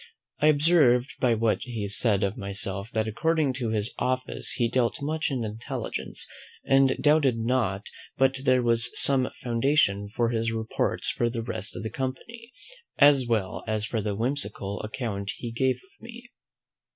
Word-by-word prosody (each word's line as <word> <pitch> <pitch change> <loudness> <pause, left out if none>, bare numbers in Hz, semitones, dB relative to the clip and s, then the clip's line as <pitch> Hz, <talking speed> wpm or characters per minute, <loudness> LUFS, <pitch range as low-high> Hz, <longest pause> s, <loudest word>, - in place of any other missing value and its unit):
I 150 - +4
observed 145 -5 +4
by 120 -3 +3
what 110 0 +1
he 115 -6 -4
said 100 0 +1
of 100 +1 0
myself, 100 -1 -4
that 110 -1 -1
according 155 +4 +1
to 125 -3 -3
his 110 0 -1
office 130 0 -2
he 120 - +1
dealt 120 -1 0
much 155 +3 -1
in 130 -4 -2
intelligence; 110 +1 -5 0.4
and 135 -1 +4
doubted 145 -5 +3
not 115 -4 0 0.3
but 135 0 +2
there 130 -2 +3
was 115 0 +3
some 135 -2 +3
foundation 115 -5 +2
for 115 +2 0
his 115 -1 0
reports 110 0 -1
for 120 - 0
the 115 -1 -4
rest 105 -3 -5
of - - -5
the 110 - -4
company, 230 - -6 0.5
as 140 -3 +6
well 110 -5 -1
as 110 -1 -1
for 110 0 -2
the 105 -1 -2
whimsical 105 -4 -3
account 105 -3 -4
he 120 - -5
gave 130 +2 +1
of 190 +10 -24
me. 240 +1 -11
120 Hz, 165 wpm, -26 LUFS, 110-135 Hz, 0.5 s, as